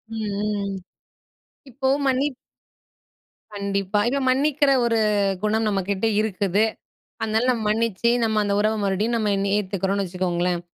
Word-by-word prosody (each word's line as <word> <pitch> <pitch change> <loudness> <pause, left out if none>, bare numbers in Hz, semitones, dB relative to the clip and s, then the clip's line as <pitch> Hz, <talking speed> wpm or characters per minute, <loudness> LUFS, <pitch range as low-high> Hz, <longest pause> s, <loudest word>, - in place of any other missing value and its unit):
ம், 220 -1 -3 0.2
ம். 205 -2 -2 1.0
இப்போ 265 +2 -2 0.2
மன்னி 265 +1 +2 1.3
கண்டிப்பா. 200 0 -1
இப்ப 280 +2 0
மன்னிக்கிற 280 +2 +2
ஒரு 230 -1 +2 0.4
குணம் 220 +1 +1
நம்ம 200 -2 +1
கிட்ட 200 +2 0 0.2
இருக்குது. 200 -1 0 0.6
அதனால 220 +3 +1
நம்ம 230 -3 -1
மன்னிச்சி, 230 0 +1
நம்ம 220 -1 +1
அந்த 200 0 0
உறவ 215 +1 +2
மறுபடியும் 205 +4 0
நம்ம 215 -2 0
இன்னி 195 0 -1
ஏத்துக்கறோனு 195 0 -1
வச்சுக்கோங்களேன். 180 -1 -1
210 Hz, 130 wpm, -23 LUFS, 195-230 Hz, 1.3 s, மன்னி